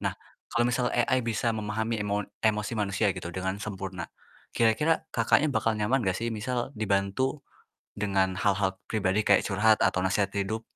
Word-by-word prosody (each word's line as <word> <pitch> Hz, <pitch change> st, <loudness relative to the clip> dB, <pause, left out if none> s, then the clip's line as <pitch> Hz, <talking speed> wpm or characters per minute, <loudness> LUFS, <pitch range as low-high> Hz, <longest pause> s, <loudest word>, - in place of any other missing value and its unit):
Nah, -, -, -2 dB, 0.3 s
kalau 120 Hz, 0 st, +1 dB
misal 125 Hz, 0 st, +1 dB
AI 130 Hz, +1 st, +2 dB
bisa 115 Hz, 0 st, 0 dB
memahami 110 Hz, +1 st, -2 dB
emo 105 Hz, 0 st, -1 dB, 0.2 s
emosi 105 Hz, 0 st, +1 dB
manusia 105 Hz, -1 st, 0 dB
gitu 90 Hz, -2 st, -6 dB
dengan 95 Hz, +2 st, -2 dB
sempurna, 95 Hz, -4 st, -5 dB, 0.5 s
kira-kira 120 Hz, +8 st, +2 dB
Kakaknya, 140 Hz, +5 st, +3 dB
bakal 110 Hz, -1 st, +1 dB
nyaman 115 Hz, +6 st, +1 dB
gak 95 Hz, -4 st, 0 dB
sih 115 Hz, 0 st, -2 dB
misal 120 Hz, +4 st, -3 dB
dibantu 110 Hz, +6 st, -1 dB, 0.5 s
dengan 95 Hz, -2 st, +1 dB
hal-hal 95 Hz, -1 st, +1 dB
pribadi 105 Hz, -1 st, 0 dB
kayak 100 Hz, -, +5 dB
curhat 105 Hz, +2 st, +3 dB
atau 90 Hz, 0 st, +2 dB
nasehat 100 Hz, +1 st, +1 dB
hidup? 110 Hz, +3 st, -1 dB
105 Hz, 155 wpm, -28 LUFS, 100-115 Hz, 0.5 s, kayak